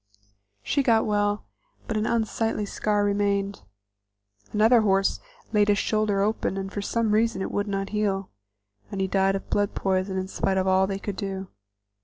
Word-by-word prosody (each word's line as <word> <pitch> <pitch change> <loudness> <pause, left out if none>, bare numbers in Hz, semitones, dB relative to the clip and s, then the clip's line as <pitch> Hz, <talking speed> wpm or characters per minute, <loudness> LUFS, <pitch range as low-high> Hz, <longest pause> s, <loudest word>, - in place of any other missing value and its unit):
She 280 - +1
got 230 -4 +3
well, 205 -1 0 0.4
but 220 - -2
an 215 +1 0
unsightly 225 -1 0
scar 205 0 0
remained. 200 -1 0 0.9
Another 220 +3 +5
horse 195 -2 +2 0.3
laid 210 -1 +4
his 205 -1 +3
shoulder 215 -2 +1
open, 210 -2 -1
and 195 0 -5
for 205 - -2
some 225 +1 0
reason 215 -2 +2
it - - -4
would 205 +1 -1
not 195 -1 -2
heal, 200 -3 -1 0.6
and 195 - -5
he 190 - +2
died 195 0 +2
of 195 - -6
blood 205 -1 +1
poison 190 0 0
in 185 0 -2
spite 190 0 -1
of 190 - +1
all 190 0 +3
they 195 0 -2
could 195 0 -5
do. 190 -1 -4
205 Hz, 175 wpm, -25 LUFS, 195-215 Hz, 0.9 s, Another